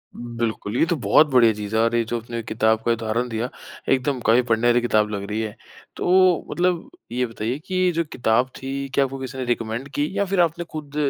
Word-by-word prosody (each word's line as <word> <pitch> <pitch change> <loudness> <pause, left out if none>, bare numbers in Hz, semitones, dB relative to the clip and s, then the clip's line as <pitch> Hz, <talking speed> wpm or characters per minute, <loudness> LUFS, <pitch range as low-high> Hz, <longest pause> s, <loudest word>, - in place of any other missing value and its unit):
बिल्कुल। 115 -2 -3
ये - - +4
तो 170 - 0
बहुत 130 +10 +5
बढ़िया 115 -3 +6
चीज़ 105 +1 -5
है 110 - +4
और 115 +1 +2
ये 115 - +3
जो 120 +1 -2
अपने 115 0 -5
किताब 110 0 +1
का 120 - +3
उदाहरण 115 +2 -1
दिया 115 +3 -2 0.4
एकदम 130 0 0
काफ़ी 120 +3 +5
पढ़ने 115 +1 +3
वाली 120 0 +4
किताब 110 -3 +2
लग 100 -1 -4
रही 110 +2 -1
है। 105 -2 -4 0.4
तो 185 -1 +3
मतलब 175 -1 0 0.2
ये 125 +1 0
बताइए 115 +4 -4
कि 185 -1 +1
जो 170 - +2
किताब 120 +2 +1
थी 135 +1 -4
क्या 140 -1 +3
आपको 135 0 -6
किसी 130 0 -6
ने 130 - -3
रिकमेंड 120 +2 -2
की 145 +1 +1
या 200 - +2
फ़िर 190 -1 -1
आपने 170 +1 0
ख़ुद 150 -2 -7
120 Hz, 220 wpm, -23 LUFS, 110-140 Hz, 0.4 s, बढ़िया